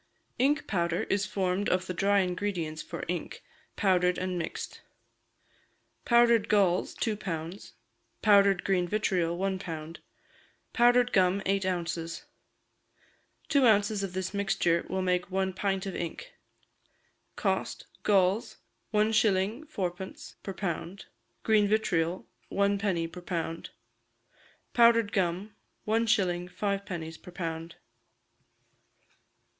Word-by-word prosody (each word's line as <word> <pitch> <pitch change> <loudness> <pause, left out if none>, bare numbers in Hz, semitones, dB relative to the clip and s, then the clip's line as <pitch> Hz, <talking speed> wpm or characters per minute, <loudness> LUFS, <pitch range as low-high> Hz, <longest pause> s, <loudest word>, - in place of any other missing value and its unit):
Ink 280 +4 +2
powder 170 -3 0
is 200 0 +1
formed 190 +1 0
of 185 0 +1
the 185 - -4
dry 200 +2 +3
ingredients 180 -4 -2
for - - -6
ink, 175 0 -4 0.3
powdered 180 -3 +2
and 185 0 -2
mixed. 165 - -5 1.2
Powdered 235 -2 +4
galls, 190 -4 +2
two 220 -2 -1
pounds; 175 -2 -6 0.5
powdered 200 -3 +5
green 180 -2 +1
vitriol, 175 -4 0
one 190 0 -1
pound; 165 -2 -7 0.7
powdered 245 0 +4
gum, 190 +1 +3
eight 195 -1 +1
ounces. 170 -2 -3 1.2
Two 280 -5 +4
ounces 205 -1 +3
of 195 -2 -4
this 185 +1 -3
mixture 185 -4 +1
will 190 +1 -1
make 180 0 0
one 190 0 -1
pint 195 0 -1
of 195 - -4
ink. 460 - -5 1.0
Cost: - - -1 0.2
galls, 195 +1 +2 0.3
1s. 215 +3 +2
4d. 190 - -5
per 195 - -5
pound; 185 0 -4 0.4
green 215 -2 +4
vitriol, 180 -5 0 0.3
1d. 200 -4 +1
per 180 - -9
pound; 165 -2 -4 1.0
powdered 230 -3 +5
gum, 190 +2 -1 0.3
1s. 210 -6 +1
5d. 180 -4 -4
per 180 - -11
pound. 165 -2 -5
190 Hz, 110 wpm, -29 LUFS, 175-205 Hz, 1.2 s, powdered